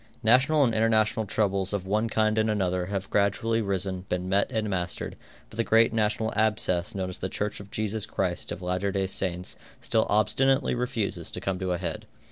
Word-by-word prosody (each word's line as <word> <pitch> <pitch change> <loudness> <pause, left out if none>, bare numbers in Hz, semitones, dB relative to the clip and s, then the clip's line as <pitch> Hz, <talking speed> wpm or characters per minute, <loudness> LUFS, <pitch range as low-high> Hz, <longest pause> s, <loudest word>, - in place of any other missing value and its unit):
National 135 +7 +5
and 120 -4 +2
international 110 0 +2
troubles 100 -2 0
of 100 -2 -2
one 105 +4 0
kind 110 0 +2
and 110 0 +2
another 90 -4 0
have 100 0 -3
gradually 105 +3 +1
risen, 95 -2 -1
been 90 0 -2
met 100 +2 +1
and 110 -1 -1
mastered, 90 -3 -3 0.4
but - - -11
the 115 - +2
great 115 +1 +4
national 110 0 0
abscess 105 -5 +1
known 95 -1 -2
as 90 - -7
the 95 - -3
Church 105 +2 -3
of 100 0 -11
Jesus 110 0 -2
Christ 90 -2 -2
of 90 - -6
Latter 90 +2 -1
Day 95 -1 0
Saints 90 -1 -3 0.2
still - - +1
obstinately 130 +7 +3
refuses 120 -4 -2
to - - -5
come 95 -1 -2
to 95 -1 -2
a - - -1
head. 85 -2 -5
100 Hz, 195 wpm, -27 LUFS, 95-110 Hz, 0.4 s, National